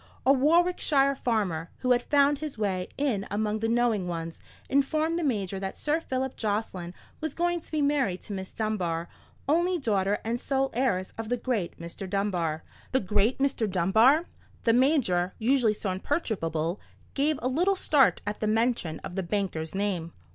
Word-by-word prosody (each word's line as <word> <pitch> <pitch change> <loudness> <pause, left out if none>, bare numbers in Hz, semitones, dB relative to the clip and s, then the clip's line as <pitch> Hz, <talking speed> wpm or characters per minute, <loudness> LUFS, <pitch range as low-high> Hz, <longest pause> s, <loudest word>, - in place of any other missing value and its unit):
A 270 - +7
Warwickshire 295 -1 +3
farmer, 200 -11 -1
who 255 - +1
had 245 0 +4
found 285 +1 +3
his 305 -5 -5
way 190 -4 -1
in 245 -9 0
among 210 +1 -1
the 225 +1 0
knowing 230 -5 +1
ones, 165 -1 -5 0.3
informed 310 +4 +1
the - - -2
Major 200 -8 -1
that 190 0 -5
Sir 305 +2 0
Philip 265 -3 -3
Jocelyn 200 -5 -3 0.2
was 315 0 -4
going 345 0 0
to - - -18
be 305 -2 +1
married 270 -11 +1
to 205 - -7
Miss 190 -1 -6
Dunbar, 180 -7 -2 0.4
only 345 +5 +2
daughter 205 - +1
and 235 +2 -2
sole 270 -1 0
heiress 210 -7 0
of 225 -1 -4
the 245 - +1
great 225 -8 -2
Mr. 170 +3 -7
Dunbar. 180 -6 -1 0.3
The 260 - +4
great 210 +4 +1
Mr. 270 -6 0
Dunbar! 220 - +4 0.4
The 230 - +4
Major, 235 - +2
usually 235 -2 +2
so 200 -2 -3
imperturbable, 185 - -2 0.3
gave 290 +2 +1
a 250 - -1
little 350 +10 +2
start 295 -6 +3
at 210 0 -3
the 215 - -1
mention 220 -7 +1
of - - -7
the 190 - 0
banker's 180 -4 -2
name. 185 -5 -2
220 Hz, 170 wpm, -27 LUFS, 190-275 Hz, 0.4 s, A